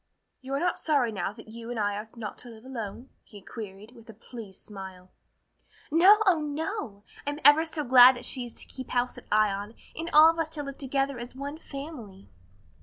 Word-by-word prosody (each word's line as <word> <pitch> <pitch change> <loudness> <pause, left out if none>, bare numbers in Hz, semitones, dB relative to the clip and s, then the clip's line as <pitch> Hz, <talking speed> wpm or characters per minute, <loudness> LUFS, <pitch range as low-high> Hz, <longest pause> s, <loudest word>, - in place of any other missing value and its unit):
"You 265 +1 -4
are - - 0
not 355 +2 0
sorry 280 -7 +1
now 195 -3 -3
that 225 0 -14
you 230 +1 -9
and 240 -2 -3
I 205 -1 0
are 210 +2 -6
not 220 -3 -7
to 245 - -11
live 225 +1 -13
alone?" 240 0 -7
he 205 - -13
queried, 205 +1 -9
with 230 -2 -17
a 225 - -11
pleased 220 -4 -11
smile. 190 -3 -10 0.8
"No, 365 +7 +7
oh, 365 -5 +4
no! 300 - -4 0.2
I'm 290 +1 -2
ever 295 +2 +8
so 315 -2 -3
glad 250 0 +8
that 245 - -7
she 255 - -4
is 240 - -9
to - - -5
keep 260 -1 -9
house 245 0 -1
at - - -21
Ion 210 0 +1 0.2
and 330 +2 -4
all 310 +2 +8
of 330 - -8
us 320 -1 -1
to 295 - -3
live 275 -1 -8
together 270 -1 -1
as 245 +1 -8
one 285 +3 -6
family." 275 -11 -9
245 Hz, 210 wpm, -28 LUFS, 215-290 Hz, 0.8 s, ever